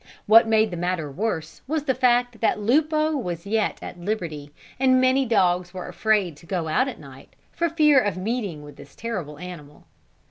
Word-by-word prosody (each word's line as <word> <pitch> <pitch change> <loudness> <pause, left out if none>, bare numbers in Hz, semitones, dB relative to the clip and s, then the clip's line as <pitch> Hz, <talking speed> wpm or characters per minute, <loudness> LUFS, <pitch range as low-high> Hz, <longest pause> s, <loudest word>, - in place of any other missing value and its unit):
What 225 +2 +7
made 220 -1 +3
the 175 - -5
matter 175 -4 -2
worse, 175 0 -4
was 305 +1 -1
the 270 -3 +1
fact 245 -2 +1
that 225 - +1
Lupo 305 +7 +2
was 175 - -4
yet 215 +1 0
at 175 - -8
liberty, 170 -7 -4 0.3
and 260 -1 +4
many 260 +1 +3
dogs 180 -4 +1
were 180 - -6
afraid 205 -7 0
to 165 - -17
go 175 -3 -2
out 250 - +1
at 265 - -6
night 135 -2 -14 0.2
for 340 0 -1
fear 300 -3 +5
of 205 -4 -2
meeting 200 -6 -3
with 145 0 -13
this 140 -1 -14
terrible 185 -11 -5
animal. 160 -4 -10
210 Hz, 185 wpm, -24 LUFS, 170-250 Hz, 0.3 s, What